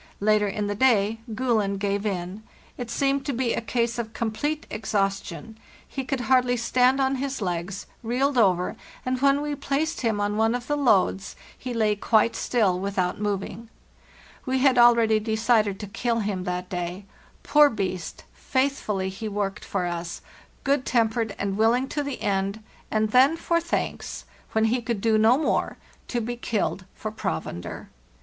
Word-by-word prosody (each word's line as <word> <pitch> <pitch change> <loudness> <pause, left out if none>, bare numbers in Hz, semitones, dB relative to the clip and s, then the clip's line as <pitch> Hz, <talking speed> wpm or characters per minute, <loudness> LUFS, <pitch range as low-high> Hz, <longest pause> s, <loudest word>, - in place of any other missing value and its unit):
Later 210 0 +3
in 205 +1 -2
the 205 - -1
day 220 -2 +3 0.2
'Gulen' 220 -5 +1
gave 200 +1 -1
in; 185 +1 -4 0.3
it 245 -2 -6
seemed 275 +3 +1
to 280 - 0
be 245 -1 0
a - - -1
case 235 +1 -1
of 225 -1 -4
complete 290 +7 -2
exhaustion, 200 0 -2 0.3
he 270 - -4
could 260 0 -2
hardly 250 0 +3
stand 250 +3 +3
on 270 0 +1
his 275 +1 -3
legs, 180 0 -3 0.2
reeled 260 +4 0
over, 185 -6 +3 0.3
and 255 0 -1
when 280 +1 +3
we 295 0 -2
placed 290 +3 -1
him 225 -4 0
on 205 +1 0
one 225 +2 +2
of 245 -1 -4
the 295 - 0
loads 200 -8 +2 0.2
he 255 - -6
lay 215 -3 +2
quite 220 +2 +2
still 200 -7 +1
without 190 -2 -1
moving. 205 +2 -3 0.7
We 260 -1 0
had 260 -1 +4
already 230 -2 +6
decided 220 -2 +1
to - - -4
kill 230 +4 -1
A - - 0
HARD - - -2
STRUGGLE 205 0 -1
IQI 185 - -3
him - - -5
that 180 0 -3
day. 180 +2 -4 0.4
Poor 295 -1 +6
beast; 185 -7 -4
faithfully 260 -8 -1
he 205 +4 -6
worked 205 0 -3
for 190 -3 -2
us, 170 -1 -4 0.4
good 280 -1 +2
tempered 225 -3 +1
and 195 0 -2
willing 235 +4 +3
to 295 - -2
the 280 -2 -4
end, 200 +1 -1 0.3
and 215 -1 0
then, 270 +7 +5
for 335 0 +1
thanks, 335 - -3 0.3
when 220 0 +3
he 240 +3 +1
could 235 -2 -2
do 220 +1 +2
no 225 +4 +5
more, 310 - 0 0.3
to 245 - -1
be 240 +1 -3
killed 215 -5 -2
for 215 - -5
provender! 85 - -5
220 Hz, 175 wpm, -25 LUFS, 200-255 Hz, 0.7 s, already